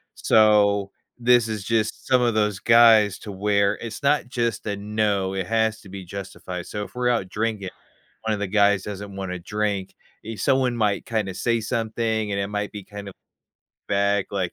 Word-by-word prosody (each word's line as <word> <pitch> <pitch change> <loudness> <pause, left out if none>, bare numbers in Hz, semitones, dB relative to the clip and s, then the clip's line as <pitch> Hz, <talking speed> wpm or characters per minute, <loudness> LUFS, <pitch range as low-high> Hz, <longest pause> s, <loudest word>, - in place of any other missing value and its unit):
So, 100 -2 +3 0.3
this 120 -1 +4
is 110 -3 -4
just 110 0 -1
some 130 -1 +4
of 120 -2 +2
those 105 -3 0
guys 115 -4 +6
to 105 - -8
where 100 +1 +1
it's 115 +2 -7
not 140 -3 +2
just 120 -5 -2
a 100 - -1
"no," 100 -2 -1
it 95 -2 -3
has 110 -1 +1
to 95 - -14
be 95 -1 -8
justified. 90 -1 -7
So 105 0 -4
if - - -11
we're 125 0 +1
out 115 -6 0
drinking, 105 -3 -2 0.5
one 110 -1 -1
of 100 - -5
the 100 - -1
guys 100 -1 +3
doesn't 100 -1 -7
wanna 95 -2 -4
drink, 100 +1 -3 0.4
someone 125 +4 +1
might 105 -3 0
kinda 105 -5 -2
say 115 +4 0
something, 110 -2 -2
and 100 - -1
it 100 - -2
might 105 0 -3
be 105 -1 -7
kind 100 -1 -9
of 95 - -10 0.7
vague, 100 0 +1
like 95 -3 -2
105 Hz, 185 wpm, -23 LUFS, 100-115 Hz, 0.7 s, guys